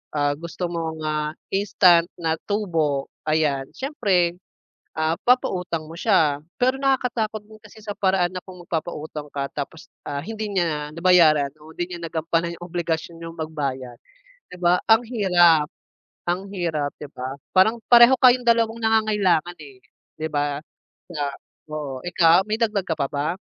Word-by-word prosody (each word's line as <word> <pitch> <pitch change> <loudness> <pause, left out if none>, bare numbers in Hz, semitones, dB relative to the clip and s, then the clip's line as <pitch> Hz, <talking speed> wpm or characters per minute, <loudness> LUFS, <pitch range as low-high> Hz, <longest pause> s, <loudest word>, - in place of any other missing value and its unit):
ah, 145 -1 +1
gusto 170 +1 -5
mong, 160 -2 -4
ah, 150 0 -1 0.2
instant 185 -3 +4
na 160 -1 -2
tubo, 165 -9 -1 0.2
ayan, 150 -3 +1
siyempre, 185 - 0 0.6
ah, 160 +1 +1
papautang 180 -10 +1
mo 160 - -10
siya. 160 -7 +2 0.2
Pero 260 +2 +1
nakakatakot 235 -5 0
din 215 0 -16
kasi 215 +1 -15
sa 210 -1 -6
paraan 185 -2 +1
na 185 - -5
kung 185 -1 -12
magpapautang 155 -3 -5
ka 140 -1 -3
tapos, 150 +2 -6 0.2
ah, 140 -1 -4
hindi 215 +6 -5
niya 160 -6 -1
nabayaran 155 -4 +4
o 155 - -13
hindi 175 +2 -5
niya 170 - -8
nagampanan 165 +1 -1
'yong 175 - -8
obligasyon 170 -1 -3
niyang 165 0 -8
magbayad, 135 -6 -4 0.5
'di 180 - -9
ba. 175 +1 +4
Ang 225 +1 +5
hirap, 175 -8 +4 0.6
ang 185 +3 -1
hirap, 160 -6 -2
'di 145 - -7
ba, 130 +1 -4 0.2
parang 220 +5 +3
pareho 240 +1 +8
kayong 250 -1 +5
dalawang 230 -1 +3
nangangailangan, 210 -6 +2
eh, 140 -4 -13 0.4
'di 160 - -2
ba, 145 0 -1 0.5
sa 155 -4 -5 0.5
oo. 145 -3 -4
Ikaw, 175 +1 +4
may 215 +1 -1
dagdag 210 -4 +1
ka 165 - -1
pa 140 -2 0
ba? 150 +5 -2
170 Hz, 155 wpm, -23 LUFS, 155-205 Hz, 0.6 s, pareho